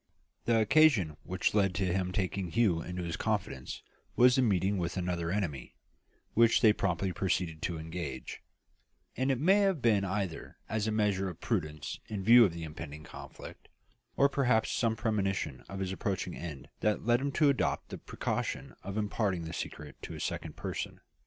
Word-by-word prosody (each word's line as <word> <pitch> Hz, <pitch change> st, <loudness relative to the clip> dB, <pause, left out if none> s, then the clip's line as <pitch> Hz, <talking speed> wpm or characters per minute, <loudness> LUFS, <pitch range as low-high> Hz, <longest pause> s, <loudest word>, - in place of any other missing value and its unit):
The 115 Hz, -1 st, +3 dB
occasion 110 Hz, -, +4 dB
which 90 Hz, -1 st, -1 dB
led 95 Hz, -4 st, +2 dB
to 95 Hz, -, 0 dB
his 90 Hz, -1 st, 0 dB
taking 95 Hz, -2 st, -1 dB
Hugh 95 Hz, -5 st, +2 dB
into 90 Hz, +1 st, -5 dB
his 85 Hz, -1 st, -3 dB
confidence 65 Hz, -1 st, -3 dB, 0.3 s
was 125 Hz, 0 st, +6 dB
the 130 Hz, -, +4 dB
meeting 100 Hz, -3 st, +2 dB
with 85 Hz, +1 st, -2 dB
another 90 Hz, -2 st, -1 dB
enemy, 85 Hz, -9 st, -3 dB, 0.6 s
which 115 Hz, 0 st, +5 dB
they 110 Hz, -3 st, +7 dB
promptly 90 Hz, -1 st, -1 dB
proceeded 85 Hz, -4 st, -1 dB
to 85 Hz, -, -2 dB
engage; 80 Hz, -5 st, -6 dB, 0.7 s
and 130 Hz, +1 st, 0 dB
it 130 Hz, -3 st, +1 dB
may 190 Hz, +8 st, +5 dB
have 195 Hz, -5 st, +2 dB
been 110 Hz, -5 st, +3 dB
either 95 Hz, -3 st, -3 dB
as 110 Hz, 0 st, -1 dB
a -, -, +1 dB
measure 100 Hz, -3 st, +1 dB
of 85 Hz, -, -9 dB
prudence 75 Hz, -9 st, -3 dB
in 100 Hz, -3 st, -4 dB
view 120 Hz, +4 st, +8 dB
of 95 Hz, -, 0 dB
the 85 Hz, -, -5 dB
impending 75 Hz, -1 st, -7 dB
conflict, -, -, -11 dB, 0.5 s
or 140 Hz, -, +6 dB
perhaps 125 Hz, -5 st, +2 dB
some 115 Hz, -2 st, +1 dB
premonition 95 Hz, -, -1 dB
of 95 Hz, -, -6 dB
his 95 Hz, -1 st, -2 dB
approaching 95 Hz, -2 st, -2 dB
end 75 Hz, -6 st, -7 dB
that 105 Hz, 0 st, 0 dB
led 120 Hz, +2 st, +3 dB
him 140 Hz, 0 st, -1 dB
to 150 Hz, -3 st, +4 dB
adopt 140 Hz, -, 0 dB
the -, -, -7 dB
precaution -, -, -3 dB
of 100 Hz, +2 st, -5 dB
imparting 100 Hz, -4 st, 0 dB
the 80 Hz, +1 st, -6 dB
secret 75 Hz, -3 st, -7 dB
to -, -, -7 dB
a -, -, -7 dB
second -, -, -4 dB
person. -, -, -5 dB
95 Hz, 180 wpm, -31 LUFS, 85-115 Hz, 0.7 s, view